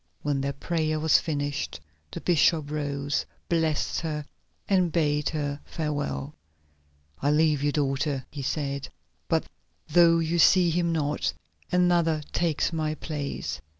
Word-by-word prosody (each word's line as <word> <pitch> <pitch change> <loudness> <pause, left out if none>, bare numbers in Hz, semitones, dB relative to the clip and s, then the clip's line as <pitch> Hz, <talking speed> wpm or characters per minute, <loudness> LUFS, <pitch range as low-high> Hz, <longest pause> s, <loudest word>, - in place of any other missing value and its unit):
When 145 -2 0
their 140 +1 -1
prayer 155 +2 -1
was 160 0 +5
finished 145 -2 -3 0.3
the - - -6
bishop 160 -3 +3
rose, 145 -1 -1 0.3
blessed 160 -3 +1
her, 150 -3 -3 0.4
and 185 -4 +3
bade 150 -3 +1
her 145 -2 -2
farewell. 145 - -3 0.9
"I 145 - +2
leave 150 -1 +3
you, 145 0 +2
daughter," 140 -1 -1
he 145 - -6
said, 140 0 -2 0.4
"but - - +1 0.4
though 165 +1 +6
you 165 +1 0
see 175 +1 +6
him 170 0 +1
not, 150 - 0 0.4
another 175 -3 +3
takes 165 -1 +1
my 155 -1 -1
place. 145 - -4
150 Hz, 130 wpm, -27 LUFS, 145-165 Hz, 0.9 s, though